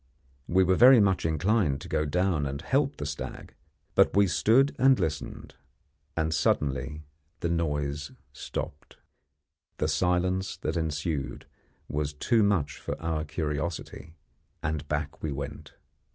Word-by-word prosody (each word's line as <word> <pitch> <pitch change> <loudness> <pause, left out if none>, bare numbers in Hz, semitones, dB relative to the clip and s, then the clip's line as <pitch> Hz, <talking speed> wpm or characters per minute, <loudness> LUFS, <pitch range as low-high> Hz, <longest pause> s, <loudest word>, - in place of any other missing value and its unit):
We 95 +2 +4
were 95 0 +3
very 125 +5 +8
much 95 -5 +2
inclined 80 -2 +1
to - - -8
go 75 - 0
down 90 -2 +1
and 70 +1 -4
help 140 +1 +1
the 75 - -4
stag; 75 0 -6 0.4
but - - +4
we 100 - +6
stood 115 +9 +3
and 135 0 +5
listened, 80 -5 -4 0.6
and 80 -1 +1
suddenly 70 0 0 0.4
the 85 - 0
noise 75 -3 -1 0.2
stopped. 70 - -6 0.8
The 75 - 0
silence 90 +3 0
that 90 - -3
ensued 75 -3 -2 0.4
was 75 0 -2
too 115 - +2
much 90 -8 +1
for - - -5
our 80 -1 -2
curiosity, 80 +1 -4 0.5
and 75 0 -2
back 75 0 -3
we 80 - -2
went. 70 0 -6
80 Hz, 135 wpm, -28 LUFS, 75-95 Hz, 0.8 s, very